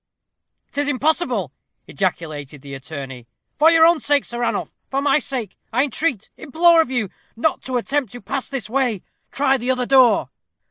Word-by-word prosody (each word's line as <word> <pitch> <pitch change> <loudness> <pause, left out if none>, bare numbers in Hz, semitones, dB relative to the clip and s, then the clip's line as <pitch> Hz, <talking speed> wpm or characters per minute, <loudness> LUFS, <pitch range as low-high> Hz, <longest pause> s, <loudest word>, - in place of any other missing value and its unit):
"'Tis 285 0 -1
impossible," 260 - 0 0.3
ejaculated 155 -7 -4
the 140 -1 -9
attorney. 135 -3 -8 0.3
"For 315 +2 +7
your 330 -1 +6
own 340 -1 +4
sake, 290 -2 +1
Sir 240 - -6
Ranulph 240 - -2 0.2
for 270 - -1
my 280 +1 +3
sake 245 -9 -5 0.2
I 250 +4 +2
entreat 275 - -2
implore 330 +3 +4
of 320 - -2
you 245 -6 -1 0.3
not 275 +7 0
to 255 -1 -1
attempt 265 -1 -1
to 245 - -8
pass 270 -2 -4
this 270 -6 -4
way. 240 -4 -1 0.3
Try 270 0 +2
the 245 +2 -3
other 255 -1 +1
door." 260 -2 +4
255 Hz, 170 wpm, -21 LUFS, 205-290 Hz, 0.3 s, For